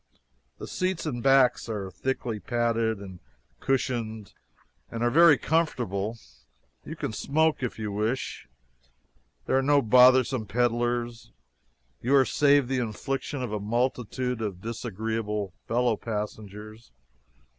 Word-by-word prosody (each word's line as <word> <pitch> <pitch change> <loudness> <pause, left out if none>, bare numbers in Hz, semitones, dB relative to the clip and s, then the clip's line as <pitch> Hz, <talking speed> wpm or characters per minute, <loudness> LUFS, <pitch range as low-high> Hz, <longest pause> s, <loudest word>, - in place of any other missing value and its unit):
The - - -7
seats 185 -2 -2
and 125 -6 -3
backs 135 -2 +4
are 100 -4 -4
thickly 120 -1 -3
padded 115 +1 0
and 95 -3 -10 0.4
cushioned 115 -5 -2 0.6
and 115 0 -4
are 120 - +2
very 165 0 +7
comfortable; 120 - -1 0.7
you - - -7
can - - -4
smoke 155 +6 +1
if 125 - -3
you 105 -2 -4
wish; 110 +6 -3 1.0
there - - +1
are 135 - +4
no 145 +1 +4
bothersome 125 -1 +5
peddlers; 120 +1 -1 0.7
you 130 +4 +2
are 135 -1 +6
saved 145 -2 +3
the 130 0 0
infliction 130 +4 -3
of 120 - -4
a 105 - -2
multitude 125 +2 -1
of 100 -5 -4
disagreeable 110 -3 -3
fellow 120 -1 +2
passengers. 105 0 -7
120 Hz, 125 wpm, -27 LUFS, 110-130 Hz, 1.0 s, very